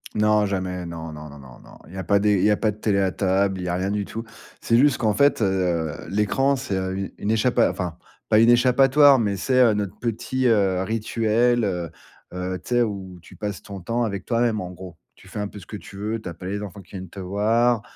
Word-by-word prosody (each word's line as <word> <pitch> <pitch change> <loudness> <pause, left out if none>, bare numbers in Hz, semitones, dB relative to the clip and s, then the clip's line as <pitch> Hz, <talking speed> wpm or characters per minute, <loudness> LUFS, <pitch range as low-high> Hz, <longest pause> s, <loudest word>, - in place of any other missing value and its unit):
Non, 105 0 +3
jamais. 95 -2 -3
Non, 80 -1 -7
non, 75 0 -9
non, 70 0 -12
non, 65 -3 -14
non, - - -16
il 85 - -14
y - - -8
a 95 - -3
pas 100 +1 +3
des 105 +1 +3
il 90 - 0
y 105 - +4
a 105 - +2
pas 110 - +1
de 105 - -5
télé 105 -2 +1
à 95 -1 +1
table, 95 0 0
il - - -4
y - - -4
a 90 - -1
rien 95 +2 -1
du 100 0 -1
tout. 115 +3 -6 0.4
C'est 115 - +2
juste 140 0 +4
qu'en 110 -2 +1
fait, 140 -3 +3
heu, 90 -5 0 0.2
l'écran, 120 +7 +1
c'est, 130 -7 -3
heu, 95 0 -2
u 95 0 -5
une 105 - -2
échappa 115 +2 +3
enfin, 90 -3 -5 0.3
pas 110 - +5
une 115 +2 +6
échappatoire, 135 +3 +5
mais 105 -5 0
c'est, 130 +7 +1
heu, 120 -4 +6
notre 105 -3 -3
petit, 125 +3 -2
heu, 95 -5 +2
rituel, 115 +2 +1
heu. 90 -4 -2 0.4
Heu, 90 +1 -4
tu - - -18
sais? 120 0 +3
Où 95 -4 -5
tu - - -15
passes 105 -2 -5
ton 100 -2 -8
temps 115 +6 -1
avec 100 -3 -3
toi 115 -2 0
même 115 -3 +1
en 90 - -6
gros. 90 -2 -11 0.2
Tu - - -18
fais - - -7
un 105 - -2
peu 105 - -12
ce 95 - -13
que 105 - -7
tu 95 +1 -12
veux, 110 +2 -3
tu 95 - -6
as - - -7
pas 90 - -11
les 100 +2 -3
enfants 100 -1 -8
qui 95 - -21
viennent 95 -2 -7
te 100 - -10
voir, 110 +5 +1
100 Hz, 265 wpm, -23 LUFS, 95-115 Hz, 0.4 s, une